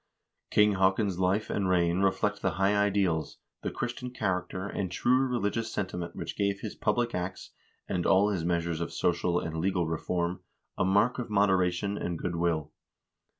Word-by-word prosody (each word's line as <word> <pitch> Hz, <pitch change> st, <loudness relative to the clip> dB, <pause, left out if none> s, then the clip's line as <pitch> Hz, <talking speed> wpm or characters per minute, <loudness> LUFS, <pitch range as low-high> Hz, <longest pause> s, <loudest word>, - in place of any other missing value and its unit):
King 105 Hz, 0 st, +5 dB
Haakon's 95 Hz, 0 st, +2 dB
life 95 Hz, +4 st, +1 dB
and 95 Hz, -2 st, 0 dB
reign 85 Hz, -1 st, +2 dB
reflect 100 Hz, +2 st, +1 dB
the 95 Hz, -, 0 dB
high 100 Hz, +1 st, +3 dB
ideals, 100 Hz, -6 st, +1 dB, 0.2 s
the -, -, -2 dB
Christian 120 Hz, +1 st, -4 dB
character, 95 Hz, -5 st, -2 dB
and 95 Hz, -2 st, -3 dB
true 130 Hz, +7 st, +2 dB
religious 115 Hz, -2 st, -1 dB
sentiment 90 Hz, -3 st, -4 dB
which -, -, -5 dB
gave 100 Hz, 0 st, 0 dB
his 110 Hz, -, -5 dB
public 120 Hz, +2 st, 0 dB
acts, 90 Hz, +1 st, -4 dB, 0.4 s
and 90 Hz, -, -1 dB
all 100 Hz, +3 st, +4 dB
his 95 Hz, -5 st, -1 dB
measures 85 Hz, -1 st, -1 dB
of 85 Hz, -, -3 dB
social 85 Hz, 0 st, +1 dB
and 80 Hz, -1 st, -4 dB
legal 90 Hz, +1 st, +1 dB
reform 85 Hz, +2 st, -2 dB, 0.4 s
a -, -, 0 dB
mark 105 Hz, +7 st, +3 dB
of 125 Hz, -, -4 dB
moderation 100 Hz, -1 st, +2 dB
and 85 Hz, -1 st, -2 dB
good 85 Hz, +1 st, -3 dB
will. 80 Hz, -3 st, 0 dB
95 Hz, 165 wpm, -29 LUFS, 85-105 Hz, 0.4 s, King